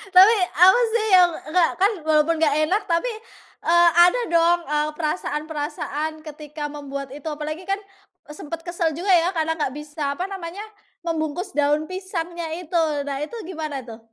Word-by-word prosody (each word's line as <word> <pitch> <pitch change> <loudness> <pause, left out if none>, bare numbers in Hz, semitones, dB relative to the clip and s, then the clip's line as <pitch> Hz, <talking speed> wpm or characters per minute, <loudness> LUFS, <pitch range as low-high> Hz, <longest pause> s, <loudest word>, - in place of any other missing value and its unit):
Tapi 390 +5 +9 0.2
apa 370 +7 +6
sih 460 -2 +1
yang, 360 -2 +6 0.2
enggak 350 0 +3
kan, 405 +3 +5
walaupun 315 +1 +3
enggak 310 -3 +2
enak 395 +7 +1
tapi, 340 +7 0 0.6
eee, 345 +1 +6 0.2
ada 485 +8 +2
dong, 340 +1 +4
eee, 300 0 +1
perasaan-perasaan 305 -1 -3
ketika 300 -1 -7
membuat 280 -2 -6
itu 285 +2 -11
apalagi 310 +3 -5
kan, 390 +2 -2 0.5
eee, 300 - -8
sempet 325 +2 -6
kesel 340 -2 -1
juga 355 +6 -4
ya 355 0 +4
karena 320 -1 -1
enggak 295 -4 -1
bisa 295 -1 -4
apa 365 +6 -4
namanya, 375 0 -6 0.4
membungkus 330 +1 -3
daun 295 +2 +1
pisangnya 345 -3 -5
itu. 345 0 -3 0.3
Nah 280 -1 -4
itu 315 - -18 0.2
gimana 310 -6 -4
tuh? 230 -2 -10
320 Hz, 160 wpm, -23 LUFS, 300-355 Hz, 0.6 s, Tapi